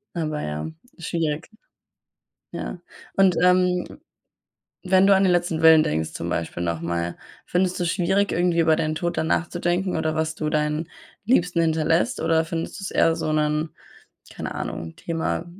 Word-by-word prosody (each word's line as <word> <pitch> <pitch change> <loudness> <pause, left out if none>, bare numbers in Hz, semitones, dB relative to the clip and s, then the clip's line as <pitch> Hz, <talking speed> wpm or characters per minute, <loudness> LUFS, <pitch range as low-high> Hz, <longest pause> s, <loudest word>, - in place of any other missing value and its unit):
Aber 155 -2 -2
ja, 75 - -4 0.2
ist 170 - -7
schwierig. 160 -1 -2 1.1
Ja. 175 - -5 0.4
Und, 190 -3 +5
ähm, 180 +5 +2 0.9
wenn 190 +1 +5
du 200 - +6
an 190 - +3
den 185 - +4
letzten 175 -2 0
Willen 160 -1 +8
denkst 80 - -1
zum 85 - -4
Beispiel 85 +1 -3
noch 85 -2 -1
mal, 85 0 -3 0.3
findest 180 0 0
du's 175 -1 0
schwierig, 195 +3 +1
irgendwie 175 -1 +1
über 160 -1 +4
deinen 155 -1 -1
Tod 170 +2 -3
dann - - +1
nachzudenken 175 +2 0
oder 155 0 0
was 160 0 -1
du 155 -1 -2
deinen 150 +1 0 0.4
Liebsten 180 -7 +2
hinterlässt 160 +7 +1
oder 165 0 +2
findest 165 +4 -4
du's 195 - -5
eher 165 0 +3
so 155 - -2
'nen, 150 +1 0 0.6
keine - - -5
Ahnung, 80 0 -5
Thema 165 +1 -3
165 Hz, 160 wpm, -23 LUFS, 155-180 Hz, 1.1 s, Willen